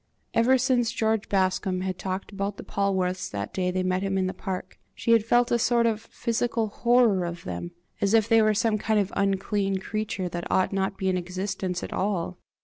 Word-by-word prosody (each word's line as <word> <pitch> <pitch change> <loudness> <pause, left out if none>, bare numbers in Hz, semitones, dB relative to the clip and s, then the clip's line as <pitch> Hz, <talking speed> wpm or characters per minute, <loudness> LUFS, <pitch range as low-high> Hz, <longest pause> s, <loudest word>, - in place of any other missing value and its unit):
Ever 255 +3 +4
since 245 -2 +2
George 220 -1 0
Bascombe 185 -1 0
had 185 -1 -3
talked 190 +1 -4
about 200 0 -3
the - - -7
Polwarths 190 -2 -1
that 100 0 -5
day 185 -1 0
they 185 0 -1
met 185 0 0
him 195 -1 -1
in 190 - +1
the 185 - -2
park, 190 -3 -6 0.2
she 230 - -1
had 230 -2 +5
felt 240 +2 +3
a 235 - +3
sort 235 0 +3
of 220 -2 +1
physical 230 -1 -1
horror 235 -4 +3
of 170 0 -5
them, 90 - -5 0.3
as 200 +2 +3
if 220 -1 +4
they 225 -1 +5
were 215 -1 +3
some 215 0 +1
kind 220 +1 +1
of 200 -1 -1
unclean 195 0 0
creature 200 -1 -3
that 175 0 -5
ought 185 +1 +2
not 195 0 0
to - - -29
be 190 - 0
in 185 - +1
existence 185 0 -3
at - - -5
all. 185 -3 -2
195 Hz, 215 wpm, -26 LUFS, 185-220 Hz, 0.3 s, had